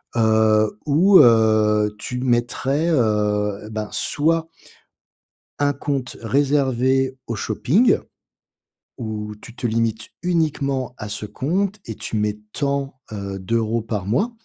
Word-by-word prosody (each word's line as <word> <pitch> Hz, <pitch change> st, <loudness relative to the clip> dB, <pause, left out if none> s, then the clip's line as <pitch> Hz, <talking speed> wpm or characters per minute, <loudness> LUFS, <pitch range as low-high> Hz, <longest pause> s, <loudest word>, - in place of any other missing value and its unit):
heu, 110 Hz, -2 st, +3 dB
où, 180 Hz, +7 st, +5 dB
heu, 110 Hz, -3 st, +4 dB
tu 125 Hz, +1 st, -4 dB
mettrais, 130 Hz, +5 st, 0 dB
heu, 105 Hz, -5 st, 0 dB
ben, 110 Hz, -1 st, -4 dB
soit 165 Hz, +2 st, 0 dB, 1.1 s
un 145 Hz, 0 st, +2 dB
compte 135 Hz, -2 st, -4 dB
réservé 130 Hz, 0 st, +1 dB
au 115 Hz, -, -3 dB
shopping. 140 Hz, -, +2 dB, 1.0 s
Où 105 Hz, -3 st, -5 dB
tu 120 Hz, -1 st, -12 dB
te -, -, -6 dB
limites 115 Hz, -1 st, -1 dB
uniquement 140 Hz, -7 st, -1 dB
à 105 Hz, -, -6 dB
ce 105 Hz, -, -4 dB
compte 190 Hz, -, -2 dB
et 110 Hz, -, -6 dB
tu 110 Hz, -, -4 dB
mets 105 Hz, 0 st, 0 dB, 0.2 s
tant, 140 Hz, -2 st, -2 dB
heu, 100 Hz, -2 st, -5 dB
d'euros 115 Hz, +3 st, 0 dB
par 105 Hz, -4 st, -4 dB
mois. 135 Hz, -, 0 dB
120 Hz, 120 wpm, -21 LUFS, 110-140 Hz, 1.1 s, où